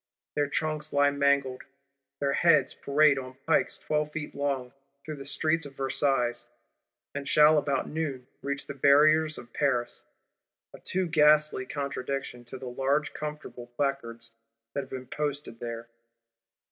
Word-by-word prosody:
Their 145 -1 +1
trunks 155 +1 -2
lie 145 0 +4
mangled: 140 -2 +1 0.6
their 140 -1 +1
heads 155 -6 +4
parade, 145 0 +3
"on 130 0 -9
pikes 160 - +2
twelve 150 0 -1
feet 155 -1 -5
long," 140 -3 -2 0.3
through 155 -1 -6
the 135 0 -8
streets 160 +3 +1
of 135 - -15
Versailles; 135 -3 0 0.7
and 140 0 -4
shall, 150 0 +6
about 140 -2 -1
noon 145 -5 -3 0.2
reach 140 0 -3
the 140 - -6
Barriers 155 +3 +4
of 120 0 -11
Paris,—a 130 -5 -4
too 185 0 -1
ghastly 150 -4 +4
contradiction 140 -3 -4
to 125 +3 -8
the 130 - -9
large 135 +4 0
comfortable 150 -5 -7
Placards 115 -4 -2 0.4
that - - -1
have 130 - -11
been 130 -1 -6
posted 145 -4 -4
there! 115 -1 -6
140 Hz, 140 wpm, -28 LUFS, 130-150 Hz, 0.7 s, shall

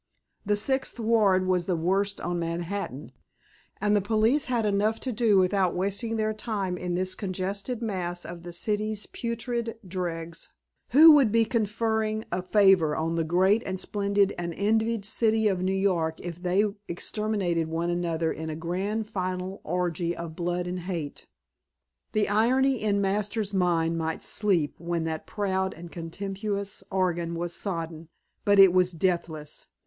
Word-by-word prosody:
The 205 - +3
Sixth 265 +4 -1
Ward 215 -5 +3
was 180 -2 +1
the 185 - +1
worst 195 +4 0
on 175 0 -2
Manhattan, 170 -3 -4 0.7
and 210 0 +2
the 205 - +3
police 220 +7 +2
had 240 -4 0
enough 210 +2 +1
to 260 - -2
do 220 -3 +3
without 185 -1 +2
wasting 200 +5 -1
their 215 0 0
time 210 -4 -3
in 180 0 -3
this 185 +1 -1
congested 200 +5 -3
mass 175 -5 -2
of 170 0 -8
the 175 0 -8
city's 210 +3 -1
putrid 235 -1 -3
dregs; 170 -2 -4 0.4
who 315 +6 +9
would 275 -8 +5
be 230 0 +4
conferring 220 -1 0
a 180 - -1
favor 185 -5 +4
on 165 +1 -1
the 165 -1 +1
great 190 +7 +3
and 190 -1 -4
splendid 200 0 +1
and 170 -1 -3
envied 220 +1 +1
City 220 0 +2
of 190 -3 0
New 185 - 0
York 180 -5 0
if 175 0 -7
they 185 +3 +2 0.2
exterminated 180 -3 -1
one 165 +2 -1
another 170 -2 0
in 160 0 -5
a 155 - -4
grand 190 +7 -2
final 185 -2 -4
orgy 175 0 -1
of 170 -2 -6
blood 175 0 -1
and 180 +1 -3
hate. 170 -5 -5 0.9
The 215 -1 +2
irony 255 +5 +2
in 205 -2 +1
Masters' 205 +1 -1
mind 165 -3 +1
might 160 0 -2
sleep 180 -9 +1
when 170 0 -2
that 160 -1 -4
proud 190 -2 -1
and 170 +1 -10
contemptuous 195 +4 -4
organ 175 -3 0
was 170 0 -3
sodden, 165 -4 -4 0.3
but 205 0 +4
it 195 -2 +8
was 185 -1 +3
deathless. 165 -3 -2
190 Hz, 155 wpm, -27 LUFS, 175-215 Hz, 0.9 s, who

